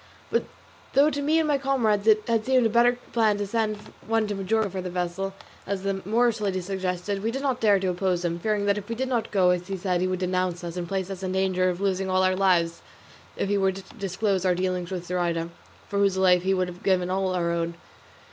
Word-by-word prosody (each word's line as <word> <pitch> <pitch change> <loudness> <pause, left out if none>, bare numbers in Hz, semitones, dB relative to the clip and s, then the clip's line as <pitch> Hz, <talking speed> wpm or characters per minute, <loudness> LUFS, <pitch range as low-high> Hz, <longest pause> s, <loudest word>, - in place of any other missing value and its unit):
But 465 - +1 0.5
though 285 +3 +5
to 285 - -2
me 305 +3 +2
and 320 -1 +2
my 290 -2 +2
comrades 225 -7 +1
it 215 -1 +5
had 230 -2 +1
seemed 255 -1 +3
a - - +3
better 240 +2 +5 0.2
plan 220 -3 +3
to 205 - -2
send 215 0 -1 0.3
to 220 -2 +1
Majorca 200 +1 0
for 190 0 -4
the 180 - -5
vessel, 180 +2 -3 0.3
as 195 -1 -3
the 195 -1 -1
Moorish 230 +1 +2
lady 195 -2 0
suggested, 185 +1 -3
we 220 - -1
did 270 +4 -3
not 265 -3 0
dare 205 -3 +4
to 190 -1 -1
oppose 180 -1 0
him, 170 0 -1
fearing 210 +1 0
that 205 0 +2
if 205 - -12
we 230 - -2
did 260 +3 -2
not 240 -3 -1
do 185 -3 +4
as 180 0 -1
he 195 -1 -3
said 180 -1 -1
he 185 - +1
would 185 0 -1
denounce 180 -1 -1
us, 170 0 -5
and 175 -1 -4
place 190 +1 -2
us 190 -1 -6
in 185 -1 -2
danger 185 -1 +1
of 180 0 -3
losing 190 -1 0
all 185 0 +2
our 185 0 +3
lives 175 -3 +2 0.6
if - - -1
he 200 0 +1
were 190 0 +3
to 190 +1 -9 0.2
disclose 195 0 0
our 185 -1 +2
dealings 180 -1 -2
with 180 -2 -4
Zoraida, 170 -2 -1 0.4
for 200 - -2
whose 200 -2 +2
life 180 -2 +4
we 190 +1 +2
would 185 -1 0
have 180 0 -8
all - - -19
given 185 -2 +1
our 185 -3 0
own. 170 0 -2
190 Hz, 245 wpm, -25 LUFS, 180-215 Hz, 0.6 s, though